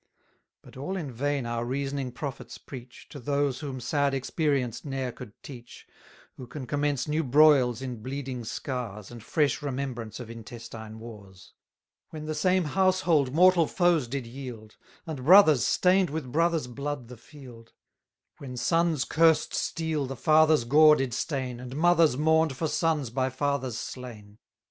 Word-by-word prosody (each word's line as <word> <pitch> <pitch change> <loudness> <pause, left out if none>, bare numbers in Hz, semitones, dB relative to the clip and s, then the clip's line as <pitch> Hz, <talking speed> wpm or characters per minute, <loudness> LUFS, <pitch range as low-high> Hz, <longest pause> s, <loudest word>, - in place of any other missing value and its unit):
But - - -16
all 165 +9 -4
in 150 -7 -5
vain 140 +2 -2
our 115 0 -2
reasoning 135 +1 -3
prophets 135 +2 -7
preach, 125 -2 -12
To 145 - -9
those 140 +1 -1
whom 135 -4 -5
sad 140 +2 0
experience 135 -3 -1
ne'er 135 -3 -3
could 120 -2 -11
teach, 120 -4 -11 0.5
Who 125 - -9
can 130 +1 -7
commence 145 -1 -1
new 155 +2 0
broils 135 -3 +4
in 125 -4 -6
bleeding 130 0 -5
scars, 110 -4 -5
And 120 -1 -10
fresh 150 +3 0
remembrance 130 -6 -4
of 120 -2 -8
intestine 115 -1 -9
wars; 100 -5 -13 0.6
When 155 -1 -8
the 155 - -3
same 180 +4 +2
household 175 -5 +2
mortal 175 +1 +5
foes 175 -7 +2
did 130 0 -4
yield, 115 -3 -9 0.3
And 155 -6 -6
brothers 160 -4 +7
stain'd 185 0 +3
with 145 -4 -5
brothers' 165 0 +1
blood 140 +1 -5
the 125 - -10
field; 120 -3 -14 0.7
When 130 -3 -8
sons' 165 0 +1
cursed 165 -1 +3
steel 160 -4 -2
the 135 - -5
fathers' 155 0 +4
gore 150 +5 +6
did 135 -4 -2
stain, 130 -5 -3
And 125 +1 -8
mothers 165 -3 +4
mourn'd 160 -2 +2
for 160 - -1
sons 155 -6 0
by 130 +1 0
fathers 130 -2 -2
slain! 110 -5 -9
135 Hz, 155 wpm, -27 LUFS, 125-155 Hz, 0.7 s, brothers